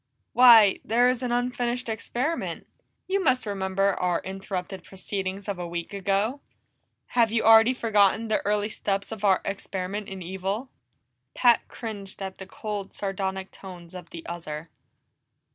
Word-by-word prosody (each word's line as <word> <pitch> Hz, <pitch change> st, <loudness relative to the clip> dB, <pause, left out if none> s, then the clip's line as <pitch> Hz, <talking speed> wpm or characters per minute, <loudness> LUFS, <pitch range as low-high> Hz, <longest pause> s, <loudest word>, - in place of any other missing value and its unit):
"Why, 230 Hz, -5 st, +8 dB
there 240 Hz, +3 st, +3 dB
is 250 Hz, -1 st, -1 dB
an 250 Hz, -1 st, -2 dB
unfinished 245 Hz, 0 st, -1 dB
experiment. 250 Hz, +7 st, -3 dB, 0.4 s
You 390 Hz, 0 st, 0 dB
must 260 Hz, -5 st, +2 dB
remember 195 Hz, -1 st, 0 dB
our 180 Hz, -1 st, +1 dB
interrupted 190 Hz, -1 st, -5 dB
proceedings 195 Hz, 0 st, -5 dB
of 200 Hz, -3 st, -3 dB
a 175 Hz, -, -4 dB
week 170 Hz, +2 st, -5 dB
ago! 200 Hz, +7 st, 0 dB, 0.7 s
Have 230 Hz, -3 st, +3 dB
you 225 Hz, 0 st, +1 dB
already 225 Hz, +3 st, +7 dB
forgotten 220 Hz, -1 st, +3 dB
the 215 Hz, -, 0 dB
early 210 Hz, +1 st, 0 dB
steps 200 Hz, -1 st, -2 dB
of 220 Hz, -2 st, -7 dB
our 195 Hz, -2 st, +4 dB
experiment 195 Hz, +1 st, -4 dB
in 190 Hz, -1 st, -7 dB
evil?" 190 Hz, +7 st, -4 dB, 0.6 s
Pat 240 Hz, -2 st, +4 dB
cringed 205 Hz, -5 st, -7 dB
at 190 Hz, -1 st, -6 dB
the 190 Hz, -, -8 dB
cold, 205 Hz, -1 st, -6 dB
sardonic 190 Hz, -1 st, -3 dB
tones 180 Hz, -3 st, -11 dB
of 180 Hz, -2 st, -9 dB
the 165 Hz, -1 st, -9 dB
other. 165 Hz, -2 st, -6 dB
200 Hz, 145 wpm, -26 LUFS, 190-225 Hz, 0.7 s, Why